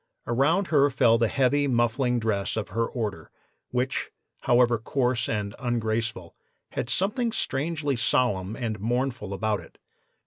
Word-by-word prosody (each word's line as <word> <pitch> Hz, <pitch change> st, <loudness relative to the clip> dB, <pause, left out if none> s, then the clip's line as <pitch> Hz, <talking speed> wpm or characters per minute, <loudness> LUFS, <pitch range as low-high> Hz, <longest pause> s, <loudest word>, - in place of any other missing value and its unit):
Around 150 Hz, +11 st, +2 dB
her 145 Hz, -3 st, +4 dB
fell 115 Hz, -3 st, +4 dB
the 115 Hz, -, +3 dB
heavy 140 Hz, +3 st, +2 dB
muffling 120 Hz, 0 st, +1 dB
dress 110 Hz, -2 st, -1 dB
of 110 Hz, -, -3 dB
her 115 Hz, +4 st, 0 dB
order, 110 Hz, -5 st, -4 dB, 0.4 s
which, 125 Hz, +1 st, -1 dB, 0.3 s
however 120 Hz, -2 st, +3 dB
coarse 125 Hz, 0 st, 0 dB
and 105 Hz, -2 st, -2 dB
ungraceful, 115 Hz, -6 st, -2 dB, 0.3 s
had 120 Hz, -, -4 dB
something 215 Hz, -, 0 dB
strangely 145 Hz, -, -1 dB
solemn 110 Hz, -5 st, +1 dB
and 110 Hz, -4 st, -3 dB
mournful 120 Hz, -1 st, -1 dB
about 105 Hz, +1 st, 0 dB
it. -, -, -15 dB
120 Hz, 135 wpm, -26 LUFS, 110-135 Hz, 0.4 s, her